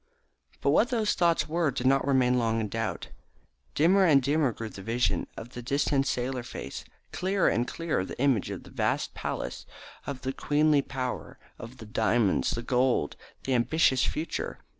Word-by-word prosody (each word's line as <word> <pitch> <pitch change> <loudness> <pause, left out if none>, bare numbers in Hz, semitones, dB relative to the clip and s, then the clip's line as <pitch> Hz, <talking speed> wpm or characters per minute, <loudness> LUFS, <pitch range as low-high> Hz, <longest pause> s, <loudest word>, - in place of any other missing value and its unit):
But 140 - +2
what 225 - +4
those 225 -4 +1
thoughts 170 -2 +2
were 165 0 +1
did 130 -1 -4
not 135 +1 +3
long 140 - +3
remain 125 -3 +2
in 110 -2 -2
doubt. 115 0 -3 0.7
Dimmer 185 +6 +4
and 155 -6 +6
dimmer 140 0 +1
grew 115 0 -6
the 100 - -10
vision 110 -4 0
of 115 - -8
the 125 - -8
distant 140 +2 +1
sailor 125 0 -1
face, 70 - -7 0.3
clearer 190 0 +1
and 120 +1 0
clearer 165 - -2
the 95 - -8
image 130 -7 +2
of - - -6
the - - -14
vast - - -1
palace, - - -5 0.4
of 140 -2 -5
the 130 0 -2
queenly 150 +1 +2
power, 130 -2 -5 0.2
of 120 +3 -9
the 110 - -10
diamonds, 110 -1 +1
the 115 - -3
gold, 125 - +1 0.3
the 135 - -1
ambitious 130 +2 +3
future. 160 +2 -3
130 Hz, 175 wpm, -28 LUFS, 120-150 Hz, 0.7 s, and